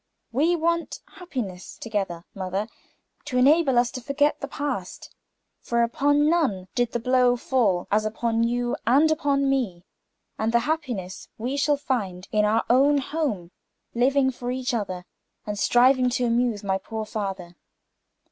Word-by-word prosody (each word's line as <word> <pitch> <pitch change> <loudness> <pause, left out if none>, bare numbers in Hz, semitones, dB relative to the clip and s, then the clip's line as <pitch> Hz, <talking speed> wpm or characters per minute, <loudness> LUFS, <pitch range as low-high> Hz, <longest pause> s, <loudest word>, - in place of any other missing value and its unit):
"We 310 +8 +2
want 335 0 -1
happiness 250 - -7
together, 195 -7 -3
mother, 190 +2 -3 0.6
to 265 -4 -2
enable 275 0 +4
us 240 0 +3
to 255 - -6
forget 285 +4 +1
the 280 - -5
past; 275 -10 -5 0.5
for 235 0 0
upon 290 +5 +2
none 270 - +1
did 245 -2 0
the 240 - 0
blow 250 0 +3
fall, 225 -8 0
as 210 +1 +3
upon 225 +1 0
you 240 +1 0
and 290 +6 +5
upon 280 -2 +1
me. 225 -11 -1 0.5
And 220 +1 0
the 235 - +4
happiness 245 - -4
we 245 +5 -3
shall 290 +1 +2
find, 205 -10 -3
in 210 -1 +2
our 220 +2 +2
own 275 +4 +4
home, 265 - -2 0.4
living 265 +2 +2
for 245 -1 -6
each 255 0 -2
other, 185 -5 -3 0.4
and 210 -1 -4
striving 255 +2 +4
to 250 - 0
amuse 235 -3 0
my 190 -1 0
poor 220 +2 -5
father." 195 -5 -5
245 Hz, 150 wpm, -25 LUFS, 210-275 Hz, 0.6 s, and